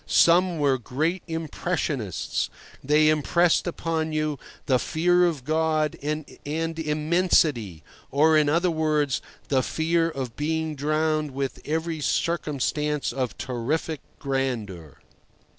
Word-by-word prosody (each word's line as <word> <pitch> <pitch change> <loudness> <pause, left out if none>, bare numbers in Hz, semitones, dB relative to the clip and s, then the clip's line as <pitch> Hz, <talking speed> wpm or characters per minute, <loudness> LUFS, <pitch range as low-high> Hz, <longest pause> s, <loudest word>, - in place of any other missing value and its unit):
Some 175 +1 +4
were 140 -3 +2
great 155 - -1
impressionists. 160 - -2 0.3
They 150 +2 +4
impressed 165 +4 +2
upon 165 -2 -2
you 155 -2 -1 0.3
the 130 -2 +3
fear 175 +4 +3
of 155 -7 -3
God 155 0 +1
and 150 +1 -3 0.5
Immensity—or, 150 - +1
in 150 -1 +4
other 170 +3 +2
words, 155 -3 +1 0.3
the 135 -2 +3
fear 165 +4 +1
of 130 -6 -5
being 160 +1 -1
drowned 155 +1 0
with 135 -1 -3
every 160 +1 -2
circumstance 150 -2 -1
of 130 -3 -3
terrific 140 +5 -2 0.2
grandeur. 115 - -3
155 Hz, 110 wpm, -25 LUFS, 135-160 Hz, 0.5 s, Some